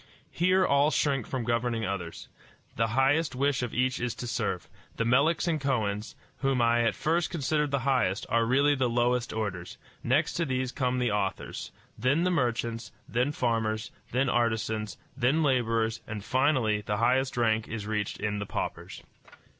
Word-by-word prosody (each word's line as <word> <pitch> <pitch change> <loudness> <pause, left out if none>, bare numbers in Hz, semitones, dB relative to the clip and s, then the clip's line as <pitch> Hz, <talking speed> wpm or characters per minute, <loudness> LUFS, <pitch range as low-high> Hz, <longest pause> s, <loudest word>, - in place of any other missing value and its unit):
Here 185 +2 +3
all 140 0 +4
shrink 140 -6 0
from 130 -3 -3
governing 115 -1 0
others. 90 -4 -5 0.5
The 115 0 +1
highest 145 +3 +2
wish 140 0 +1
of 125 -2 -3
each 130 0 0
is 120 -1 -2
to - - -6
serve. 115 - -2 0.3
The 115 - -1
Meleks 140 +9 +3
and 160 -3 0
Kohens, 110 -6 -1 0.2
whom 135 -2 0
I 120 0 +3
at 115 - +1
first 165 +2 0
considered 150 -1 0
the 140 -1 0
highest, 125 -8 +1
are 115 0 +2
really 140 +4 +4
the 130 -3 +1
lowest 120 +1 +1
orders; 100 -6 -4 0.3
next 145 +4 +2
to 170 - +1
these 130 -2 -1
come 125 -2 -1
the 125 -3 +1
authors, 100 -2 -3 0.3
then 140 +8 +2
the 180 - +2
merchants, 120 -6 -1 0.2
then 125 +4 0
farmers, 115 -5 -1 0.2
then 130 +3 +1
artisans, 110 -3 0 0.2
then 140 +5 +2
laborers, 115 -4 +1
and, 105 -2 -6
finally, 130 -6 +2
the 105 0 -2
highest 125 +4 +1
rank 110 -2 +1
is 110 -2 -5
reached 105 -1 -2
in 105 0 -2
the 100 - -4
paupers. - - -5
125 Hz, 170 wpm, -28 LUFS, 110-135 Hz, 0.5 s, all